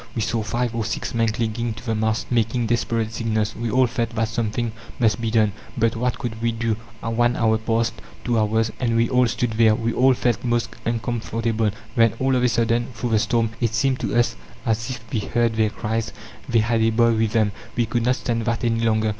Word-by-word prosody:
We 115 - 0
saw 115 +1 0
five 120 +2 -1
or 115 -1 -1
six 110 - -3
men 115 -1 +2
clinging 115 +1 -1
to 110 +3 -11
the 115 - 0
mast, 110 +2 -1
making 115 0 +1
desperate 115 -1 0
signals. 110 -2 -1
We 115 0 -3
all 130 +4 +4
felt 120 -1 -1
that 110 -1 0
something 115 +1 -1 0.3
must 110 -2 +2
be 115 - 0
done, 110 -2 +3 0.3
but 115 0 +2
what 125 +2 -1
could 115 -2 -5
we 115 0 +1
do? 115 -1 -1 0.3
One 120 +2 +1
hour 110 -1 +2
passed, 115 +1 0 0.3
two 120 -2 +1
hours, 110 +1 +1
and 115 -3 +1
we 115 +1 +3
all 125 -1 +4
stood 120 0 -1
there. 110 -1 +4
We 115 +1 -1
all 130 +1 +4
felt 120 -2 0
most 120 -1 0 0.2
uncomfortable. 115 -1 -1 0.3
Then, 115 -2 +4
all 130 +1 +1
of 125 - +2
a 125 - +3
sudden, 115 0 +1
through 120 +2 -3
the 110 - +4
storm, 115 0 +1
it 115 -1 +1
seemed 135 +1 +1
to - - -2
us 120 0 +2 0.3
as 115 +2 0
if 130 - -5
we 115 - +1
heard 115 +2 0
their 110 -1 +2
cries 110 +1 -3 0.4
they 120 -2 +4
had 115 0 +1
a 110 - +4
boy 115 +1 +3
with 110 0 0
them. 110 -3 +3 0.2
We 120 - +2
could 115 +2 -1
not 125 +2 +3
stand 115 -3 -2
that 115 +1 -1
any 115 -1 +1
longer. 110 -1 +2
115 Hz, 225 wpm, -23 LUFS, 110-120 Hz, 0.4 s, all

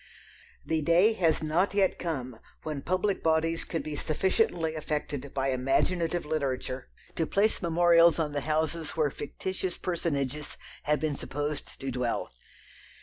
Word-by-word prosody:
The 160 -1 0
day 175 +8 +5
has 165 -7 +2
not 175 +6 +1
yet 195 -2 +2
come 130 -8 -4 0.2
when 150 -3 -3
public 185 +5 0
bodies 165 +1 +1
could 165 - -3
be 155 -1 -4
sufficiently 165 +1 +1
affected 150 -3 -3
by 135 0 0
imaginative 165 +7 +1
literature 135 -4 -2 0.3
to 160 - 0
place 210 +2 +2
memorials 170 -1 +5
on 155 -3 0
the 145 0 -2
houses 155 +2 -1
where 150 -3 +2
fictitious 185 +5 -4
personages 150 -5 -2 0.3
have 150 -1 +2
been 155 -1 -1
supposed 145 +2 -4
to 135 -1 -3
dwell. 125 -1 -2
155 Hz, 140 wpm, -29 LUFS, 145-170 Hz, 0.3 s, day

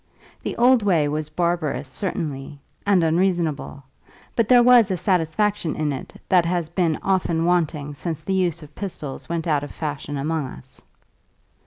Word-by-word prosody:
The - - -4
old 245 0 +5
way 175 -8 +2
was 150 +1 -2
barbarous 155 -4 -1
certainly, 145 -3 -4 0.3
and 195 -4 +4
unreasonable, 165 -4 0 0.5
but 230 -3 +2
there 245 -1 +7
was 245 -3 +6
a 185 - 0
satisfaction 180 0 0
in 150 -2 -1
it 130 - -8
that 180 -2 +4
has 170 -1 -1
been 170 -2 +1
often 170 -4 +1
wanting 155 -4 0
since 155 +1 -5
the 190 - -2
use 175 -3 0
of 150 0 -14
pistols 160 -8 -6
went 170 -1 -2
out 150 -4 +1
of 145 - -6
fashion 145 -2 -4
among 150 0 -1
us. 130 0 -13
165 Hz, 160 wpm, -23 LUFS, 150-185 Hz, 0.5 s, there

